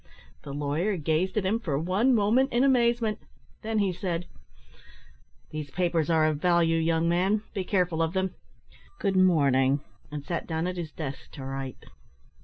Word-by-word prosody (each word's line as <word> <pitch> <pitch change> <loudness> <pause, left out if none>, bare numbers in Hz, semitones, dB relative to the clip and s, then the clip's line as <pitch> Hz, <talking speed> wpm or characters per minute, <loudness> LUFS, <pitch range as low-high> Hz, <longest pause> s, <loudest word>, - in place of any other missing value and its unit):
The 140 - -8
lawyer 150 +8 -1
gazed 165 +5 0
at 205 - +1
him 215 +5 +1
for 155 -11 -2
one 190 - +2
moment 235 +6 +3
in 240 +2 +2
amazement. 235 -4 +2 0.4
Then 220 0 -2
he 200 -3 +2
said 175 -1 -3 1.3
"These 155 -2 -5
papers 170 -1 0
are 160 -1 +4
of 155 -2 0
value, 170 -2 +3
young 165 0 +1
man: 190 +5 +2
be 195 - -2
careful 180 -4 0
of 165 +1 0
them. 190 -1 -1 0.6
Good 195 -2 0
morning 140 -7 +4
" - - -30
and 145 -1 -6
sat 170 - -3
down 160 0 -1
at 180 0 -3
his 165 -3 -5
desk 140 -4 -6
to 135 - -8
write. 135 -1 -6
175 Hz, 170 wpm, -27 LUFS, 155-200 Hz, 1.3 s, are